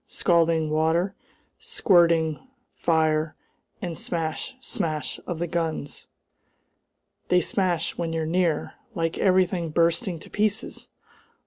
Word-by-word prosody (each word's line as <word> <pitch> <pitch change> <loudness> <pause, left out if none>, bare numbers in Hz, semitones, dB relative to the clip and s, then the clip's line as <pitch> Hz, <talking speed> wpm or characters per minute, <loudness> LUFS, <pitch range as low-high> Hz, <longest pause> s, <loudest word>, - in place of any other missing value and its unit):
Scalding 165 -3 +2
water 160 +5 +2 0.5
squirting, 170 - +2 0.3
fire, 155 -1 +1 0.5
and 175 - -2
the - - -6
smash, 165 +7 -2
smash 155 - -3
of 175 - -3
the 170 - -1
guns! 160 -4 -3 1.2
They 180 - +4
smash 180 -3 0
when 165 -1 -1
you're 165 -1 -1
near! 170 -1 0 0.2
Like 165 -2 -1
everything 185 -3 +2
bursting 170 +2 +1
to - - -12
pieces! 210 0 -1
165 Hz, 110 wpm, -25 LUFS, 160-175 Hz, 1.2 s, They